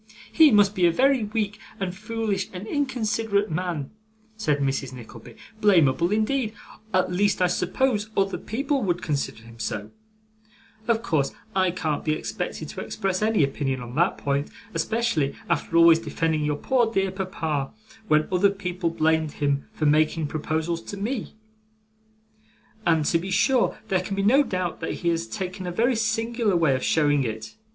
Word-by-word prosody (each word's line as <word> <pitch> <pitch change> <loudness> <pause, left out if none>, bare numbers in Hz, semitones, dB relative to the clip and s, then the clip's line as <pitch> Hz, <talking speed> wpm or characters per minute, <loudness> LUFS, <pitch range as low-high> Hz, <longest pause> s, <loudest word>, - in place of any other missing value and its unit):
'He 320 -2 +7
must 205 -3 +5
be 180 -3 +3
a - - +4
very 260 +3 +3
weak, 210 -1 -2 0.2
and 185 -2 -3
foolish, 215 -2 -2
and 185 +2 -6
inconsiderate 220 - 0
man,' 165 -4 -3 0.4
said 155 -10 0
Mrs. 135 -1 -1
Nickleby; 120 -1 -11 0.3
'blamable 170 -4 +4
indeed 220 +1 0 0.4
at 185 -2 +1
least 200 +2 +2
I 180 - +4
suppose 210 +5 0
other 195 0 +1
people 275 +4 -1
would 180 -3 -1
consider 140 -7 -2
him 115 0 -14
so; 110 -1 -4 1.0
of 230 -1 +1
course 150 -9 0 0.2
I 185 -1 +3
can't 160 -4 -2
be 155 - +1
expected 155 - -4
to - - -6
express 195 -3 -2
any 215 -6 +3
opinion 135 -1 -1
on 120 0 -8
that 175 +7 +2
point, 140 +1 -1 0.2
especially 220 -12 0
after 170 0 0
always 165 -1 +7
defending 160 -1 -1
your 150 -1 0
poor 240 - +1
dear 195 -3 +1
papa 160 -7 -2 0.4
when 155 -3 +3
other 190 +2 +4
people 185 -3 -2
blamed 160 -1 +1
him 140 -1 -1
for 155 - -3
making 155 +2 +3
proposals 160 +3 -2
to 200 - -8
me; 220 +4 -3 1.5
and 160 -3 +3
to 165 - +2
be 185 +3 -5
sure 230 +6 +2
there 190 - +2
can 195 +2 -4
be 195 - -1
no 255 +8 +5
doubt 185 - -2
that 160 - -3
he - - +4
has 165 -9 -1
taken 180 - -5
a - - -2
very 235 +7 +2
singular 225 -1 0
way 165 -5 +3
of 130 - -1
showing 145 -3 +3
it. 110 -2 -5
180 Hz, 165 wpm, -25 LUFS, 155-210 Hz, 1.5 s, He